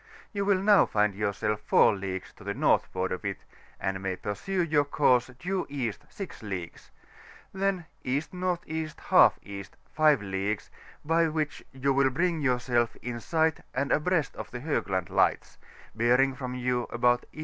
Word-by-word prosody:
you 200 -1 -1
wm 195 -1 +2
now 210 -2 +7
find 105 -1 +1
yourself 105 +1 -1
4 110 - +5
leagues 95 -1 -5
to - - -15
the 100 +1 -3
northward 95 0 +1
of 90 - -4
it, 100 -2 -2 0.4
and 95 0 -1
majr 95 -1 -3
pursue 180 - -2
your 150 -3 +3
course 130 -4 +3
due 185 +5 -2
East 125 -7 -3
6 195 -3 -8
leagues; 95 -5 -6 0.6
then 190 -2 -1 0.2
E.N.E.iE. 160 +2 -2 1.0
5 155 -4 +4
leagues, 100 +2 -3 0.3
by 165 +2 +3
which 155 -1 -2
you 135 +1 0
will 135 0 +4
bring 170 +4 0
yourself 125 -3 +1
in 120 -1 -4
si^ht 160 +5 0
and 135 +2 0
abreast 155 -2 +1
of - - -6
the 125 - -7
Hoo^and 95 - -1
Lights, - - +1 0.3
bearing 125 +4 +3
from 125 -1 -5
you 125 -1 -1
about 120 +1 +2
E. - - -13
130 Hz, 150 wpm, -28 LUFS, 105-160 Hz, 1.0 s, now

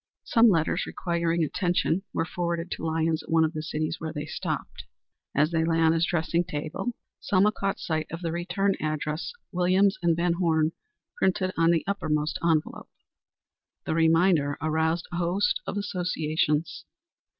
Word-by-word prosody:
Some 230 0 +5
letters 165 -5 +1
requiring 170 -1 -1
attention 175 +2 0
were - - -1
forwarded 170 +1 -3
to - - -4
Lyons 160 0 0
at - - -16
one 165 0 +4
of 160 +1 0
the 155 - -3
cities 155 0 -2
where 160 -1 -4
they 150 -1 -5
stopped. - - -5 0.5
As 150 +3 +3
they 165 -1 +1
lay 165 0 +1
on 160 -1 +5
his 165 +1 +1
dressing 170 0 +1
table 160 +8 -4 0.2
Selma 200 +1 +3
caught 195 -2 -2
sight 155 -1 -2
of 165 +2 -6
the 165 - -1
return 195 +4 0
address, 155 +1 -2 0.2
Williams 185 +2 +2
& - - -25
Van 170 +1 +2
Horne, 160 -3 +2 0.5
printed 185 - +1
on 165 0 +3
the 170 -2 +3
uppermost 155 -6 -1
envelope. 160 -2 0 1.0
The - - -1
reminder 165 -2 +3
aroused 160 +2 0
a 175 - -3
host 180 - +1
of - - -3
associations. 165 -4 -1
165 Hz, 160 wpm, -27 LUFS, 160-180 Hz, 1.0 s, Some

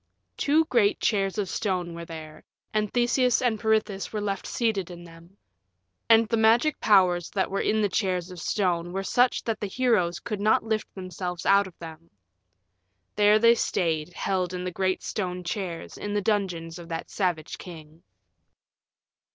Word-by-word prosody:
Two 310 +3 +2
great 230 -8 +2
chairs 195 -3 0
of 205 -2 -1
stone 180 -3 -2
were 170 0 -7
there, 155 -2 -10 0.3
and 215 -1 0
Theseus 245 0 +2
and 235 -4 0
Peirithous 215 -3 0
were 215 - -3
left 200 -2 -3
seated 215 -7 -1
in 175 -1 -10
them. 170 +3 -16 0.7
And 225 0 +6
the 230 - 0
magic 230 +7 +3
powers 180 -4 +3
that 190 -2 -1
were 195 - 0
in 215 0 +1
the - - +3
chairs 185 -3 -1
of 180 - -9
stone 175 -1 -1
were 195 +1 -2
such 245 +5 +2
that 225 -2 -2
the 205 - -3
heroes 190 -6 +1
could 210 -3 -5
not 215 +1 +3
lift 220 -1 -2
themselves 180 -2 -5
out 200 0 +4
of 180 - -15
them. 165 0 -11 1.1
There 210 0 +5
they 230 +1 +6
stayed, 170 -7 -1
held 185 -1 -1
in 180 - -4
the 180 - -3
great 185 +1 -1
stone 180 -3 -3
chairs 180 -2 -5
in 205 0 -4
the - - +2
dungeons 180 -5 -2
of 170 0 -11
that 165 -1 -5
savage 175 -6 -2
king. 160 -2 -11
195 Hz, 170 wpm, -26 LUFS, 175-215 Hz, 1.1 s, And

